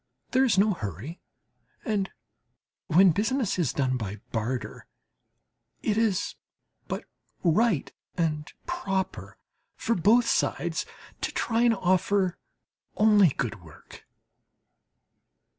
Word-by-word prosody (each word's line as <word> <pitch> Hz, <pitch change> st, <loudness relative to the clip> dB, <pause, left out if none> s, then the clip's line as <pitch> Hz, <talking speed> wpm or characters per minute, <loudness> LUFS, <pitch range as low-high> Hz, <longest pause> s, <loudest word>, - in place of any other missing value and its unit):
There 260 Hz, +1 st, +4 dB
is 245 Hz, -7 st, +3 dB
no 205 Hz, +2 st, +4 dB
hurry, 110 Hz, -, -6 dB, 0.6 s
and 205 Hz, -3 st, 0 dB, 0.8 s
when 180 Hz, +3 st, +6 dB
business 220 Hz, -, 0 dB
is 160 Hz, -7 st, +1 dB
done 130 Hz, -2 st, 0 dB
by 105 Hz, -4 st, -4 dB, 0.2 s
barter, 120 Hz, +3 st, -3 dB, 1.0 s
it 210 Hz, -, +1 dB
is 220 Hz, -4 st, +1 dB, 0.5 s
but -, -, -4 dB, 0.4 s
right 180 Hz, -, +2 dB, 0.2 s
and 155 Hz, -3 st, -1 dB
proper 195 Hz, -, -3 dB, 0.4 s
for 230 Hz, -, 0 dB
both 225 Hz, +6 st, +4 dB
sides -, -, 0 dB, 0.3 s
to -, -, -1 dB
try 230 Hz, 0 st, 0 dB
and 240 Hz, -1 st, +4 dB
offer 185 Hz, 0 st, +1 dB, 0.6 s
only 210 Hz, -4 st, +6 dB
good 120 Hz, -7 st, -3 dB
work. 80 Hz, -4 st, -15 dB
190 Hz, 105 wpm, -27 LUFS, 150-220 Hz, 1.0 s, when